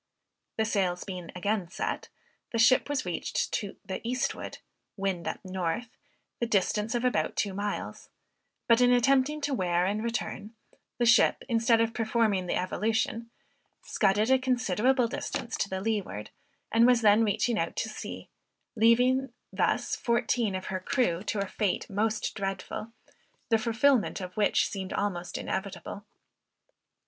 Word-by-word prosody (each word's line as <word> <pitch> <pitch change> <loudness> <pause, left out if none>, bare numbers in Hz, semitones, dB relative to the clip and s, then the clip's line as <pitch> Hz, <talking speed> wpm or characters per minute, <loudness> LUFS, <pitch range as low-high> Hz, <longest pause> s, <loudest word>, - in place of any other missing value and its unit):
The 220 - +2
sails 190 -5 0
being 180 -4 -7
again 195 -1 -1
set, - - -3 0.4
the 230 - -1
ship 255 +5 +5
was 285 -6 -1
reached 175 -2 -2
to 200 -3 -3
the 190 - -4
eastward 250 +2 -2 0.4
(wind 195 -3 -2
at - - -5
north,) 185 +5 -2 0.5
the 235 - 0
distance 210 +2 +1
of 240 +1 0
about 250 - +1
two 200 -2 -1
miles; 205 +1 -4 0.6
but 230 +1 +5
in 245 0 +5
attempting 270 +4 +3
to 285 -1 -1
wear 180 -5 +1
and 210 +3 -1
return, 225 -2 -4 0.4
the 240 - +1
ship, 235 +1 +5
instead 230 -1 +3
of 230 0 0
performing 220 -5 +1
the - - 0
evolution, 220 +4 -1 0.5
scudded 210 +3 +2
a 265 - +5
considerable 250 0 +2
distance 285 -2 -4
to 200 - -1
the 190 0 -3
leeward, 200 - -3 0.4
and 230 +1 +5
was 245 -2 +4
then 215 +1 +5
reaching 220 +2 +1
out 165 - -2
to - - -1
sea; - - -7 0.5
thus - - -9
leaving 250 +4 +4 0.7
fourteen 235 -3 +1
of 185 0 -4
her 185 - -1
crew 185 -4 0
to 205 -1 -2
a - - -9
fate 200 -1 -1
most 215 +2 0
dreadful, 195 +2 -4 0.6
the 225 -2 +4
fulfilment 235 +2 +2
of 180 -1 -6
which 210 -1 +2
seemed 190 -2 -5
almost 180 -4 -2
inevitable. 200 +1 -5
220 Hz, 150 wpm, -28 LUFS, 195-235 Hz, 0.7 s, ship